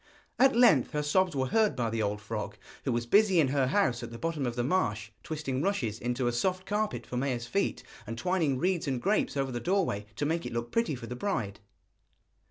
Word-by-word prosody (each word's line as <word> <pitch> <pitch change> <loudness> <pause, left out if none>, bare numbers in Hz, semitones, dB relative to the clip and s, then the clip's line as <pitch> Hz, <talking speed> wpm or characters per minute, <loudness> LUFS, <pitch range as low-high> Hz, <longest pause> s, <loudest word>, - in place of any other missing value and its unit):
At 265 0 +5
length 230 - +5
her 150 0 0
sobs 180 +2 +2
were 130 -1 +1
heard 220 - +3
by 115 -3 -1
the 115 0 -1
old 105 0 -1
frog, 105 -1 -5 0.3
who 135 - +1
was 120 0 -1
busy 195 - +4
in 145 -5 +4
her 135 -1 +2
house 130 - +1
at 120 - -6
the 115 - -8
bottom 160 -2 -2
of 120 - -3
the 120 - 0
marsh, 110 - 0
twisting 150 -4 -3
rushes 130 - -1
into 125 +1 -1
a 120 - +2
soft 185 +10 -1
carpet 210 +1 -1
for 125 - -5
Maia's 125 -2 -1
feet, 195 +11 -1 0.2
and 115 +1 -5
twining 165 -4 +1
reeds 180 +2 0
and 130 -3 0
grapes 195 - 0
over 135 -1 0
the 120 - -3
doorway, 170 - 0
to 145 - -1
make 165 +3 0
it - - -5
look 120 0 -3
pretty 230 -10 +1
for 120 - -8
the 125 - -6
bride. 120 - -2
135 Hz, 225 wpm, -29 LUFS, 120-185 Hz, 0.3 s, At